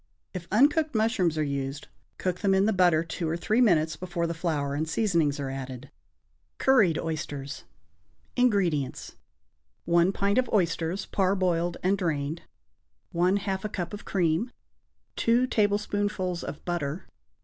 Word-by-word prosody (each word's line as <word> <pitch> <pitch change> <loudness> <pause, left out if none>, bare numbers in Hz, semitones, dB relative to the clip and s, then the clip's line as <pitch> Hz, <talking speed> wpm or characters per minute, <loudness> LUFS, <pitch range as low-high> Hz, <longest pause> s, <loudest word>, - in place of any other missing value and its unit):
If 180 -2 -6
uncooked 295 +6 +3
mushrooms 215 -7 +1
are 155 - +1
used, 140 0 -3 0.3
cook 185 -1 -2
them 195 -2 +2
in 190 +1 +3
the 220 - +2
butter 175 -4 +4
two 165 0 -4
or 165 - -1
three 215 +7 +1
minutes 160 -9 +3
before 175 -2 -3
the 170 - -2
flour 155 -4 -2
and 155 +2 -2
seasonings 160 -5 +1
are 135 -1 -3
added. 135 0 -7 0.7
=Curried 215 -12 +4
Oysters.= 145 -3 -5 0.7
INGREDIENTS. 185 - 0 0.7
1 170 +2 +4
pint 200 +3 +1
of 255 - 0
oysters 175 -1 0
(parboiled 185 -3 0
and 190 +2 +2
drained). 155 -2 -2 0.7
1/2 190 +2 +1
a 215 - -2
cup 175 -3 -4
of 205 - -7
cream. 175 +4 0 0.7
2 235 +2 +3
tablespoonfuls 205 -5 0
of 150 - -7
butter. 175 0 -3
175 Hz, 140 wpm, -27 LUFS, 160-200 Hz, 0.7 s, butter